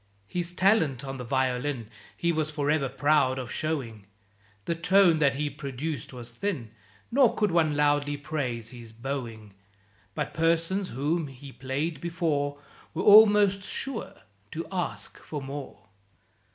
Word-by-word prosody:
His 175 - -2
talent 175 - +2
on 135 0 -5
the - - -4
violin 130 -1 -1 0.3
He 170 - +1
was 155 -2 0
for 150 -1 0
ever 145 -4 +1
proud 145 -2 +2
of 125 -2 -5
showing; 120 -10 -3 0.6
The - - 0
tone 175 0 +4
that 140 -3 +3
he 150 +2 -1
produced 140 0 -5
was 120 -2 -8
thin, 125 - -3 0.4
Nor 255 -2 +4
could 210 -3 +1
one 160 -3 +2
loudly 145 0 +2
praise 130 -6 -3
his 120 -2 -11
"bowing;" 115 -4 -5 0.6
But - - -3
persons 165 +4 +1
whom 150 +6 -1
he 135 +1 -11
played 135 +4 -3
before 160 -5 -1 0.4
Were 180 - -1
almost 205 -2 +7
sure 250 +5 -5 0.3
to 165 +8 -5
ask 180 -2 -4
for 150 - -6
more. 135 -7 -8
145 Hz, 140 wpm, -27 LUFS, 130-170 Hz, 0.6 s, almost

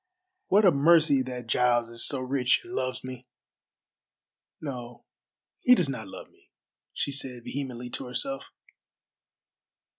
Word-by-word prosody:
What 205 +2 +5
a 185 - +8
mercy 150 -1 +5
that 125 -2 -5
Giles 120 0 +2
is 115 0 -4
so 135 -3 -1
rich 130 -1 +2
and 180 - -10
loves 130 -5 -2
me! 130 -1 -8 1.3
No, 125 -5 -7 0.5
he 250 -1 +6
does 170 - 0
not 125 -6 -5
love - - -10
me," - - -29 0.4
she 140 - -2
said 130 -3 -3
vehemently 125 -3 -5
to - - -4
herself. 135 +2 -2
130 Hz, 130 wpm, -27 LUFS, 125-140 Hz, 1.3 s, a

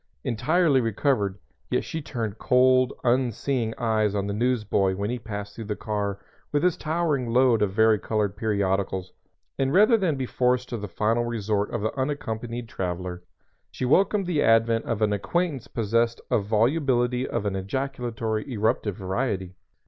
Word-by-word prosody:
Entirely 150 +4 +2
recovered, 110 -3 0 0.3
yet - - +1
she 160 - -5
turned 115 -6 -4
cold, 130 0 +4
unseeing 125 -1 +1
eyes 110 -3 +1
on 100 -1 0
the 100 - -2
newsboy 105 -4 +1
when 100 +3 -2
he 125 - -3
passed 105 -2 -6
through 115 - -7
the 105 0 -3
car 100 -2 -2 0.3
with 145 0 +1
his 180 -2 +3
towering 155 -6 -1
load 125 -2 +4
of 100 -2 +1
varicolored 110 -1 +2
periodicals, 100 -3 -1 0.5
and 135 0 +1
rather 215 +5 +6
than 180 -8 +1
be 135 -1 -2
forced 125 0 0
to 120 - -3
the 105 -1 -5
final 110 +5 0
resort 105 -3 -1
of 115 - -3
the 110 - -2
unaccompanied 120 -4 -3
traveler, 90 -2 -4 0.5
she 130 - -4
welcomed 195 +8 +3
the 170 -4 0
advent 115 0 +3
of 110 -2 -1
an 105 -1 +2
acquaintance 145 - -1
possessed 115 +1 0
of 100 - +2
volubility 125 +2 +1
of 115 -3 -2
an 100 -1 -1
ejaculatory, 115 +2 -3
eruptive 110 -3 0
variety. 95 -1 -2
115 Hz, 155 wpm, -25 LUFS, 105-130 Hz, 0.5 s, rather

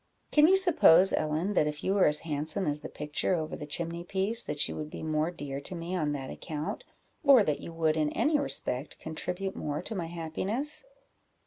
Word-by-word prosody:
Can 300 0 +6
you 380 +2 +6
suppose, 195 - +6
Ellen, 155 +6 0
that 150 - +3
if 150 0 -5
you 190 - +1
were 200 -2 +4
as 150 0 +3
handsome 155 +4 -2
as 150 -1 0
the - - -7
picture 150 +5 -1
over 155 -2 -3
the 150 - -8
chimney 170 +2 -3
piece, 200 +6 +1
that 150 - +1
you - - -6
would 150 -1 -5
be - - -8
more 155 0 0
dear 145 -5 -6
to 180 - -7
me 170 +2 -4
on 155 -4 0
that 135 -2 -5
account, 155 - -5 0.4
or 275 -6 +7
that 150 -6 -1
you - - -8
would, 160 -1 +1
in 155 -1 +1
any 300 -1 +2
respect, 140 - 0
contribute 180 +4 -4
more 150 0 -3
to 225 - -5
my 175 -5 -3
happiness?" 190 - -3
165 Hz, 210 wpm, -29 LUFS, 150-195 Hz, 0.4 s, or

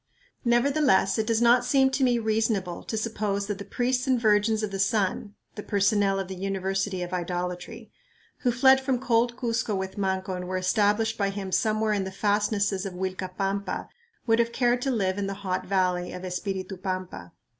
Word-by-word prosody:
Nevertheless 240 -3 +3
it 220 - 0
does 230 0 +2
not 240 +1 +5
seem 265 +1 +3
to 265 - 0
me 245 -2 +3
reasonable 220 -5 -1
to 220 - -3
suppose 210 -2 -2
that 205 -1 -4
the - - -5
priests 250 +5 -1
and 255 -2 +3
Virgins 215 0 +2
of 210 - -2
the 195 - -4
Sun 200 +1 0 0.2
(the 210 - -6
personnel 200 -1 +2
of 190 - -3
the 190 - -6
"University 195 0 -2
of 175 +1 -6
Idolatry") 180 +5 -4 0.5
who 245 - +1
fled 265 +2 +5
from 265 -1 0
cold 240 -1 +1
Cuzco 230 -4 -1
with 190 +1 -4
Manco 190 -1 -1
and 180 0 -5
were 185 0 -2
established 210 +4 +1
by 200 -1 +1
him 195 -1 -5
somewhere 215 +1 +1
in 200 -2 0
the 190 - -5
fastnesses 205 -1 0
of 195 -3 -5
Uilcapampa 190 +1 -3 0.4
would 225 -1 +3
have 235 0 +2
cared 245 0 +1
to 270 - -1
live 200 -6 0
in 200 - -1
the 195 - -4
hot 185 -1 -2
valley 180 -2 0
of 180 +1 -7
Espiritu 190 +1 -4
Pampa. 185 - -5
205 Hz, 190 wpm, -26 LUFS, 190-230 Hz, 0.5 s, not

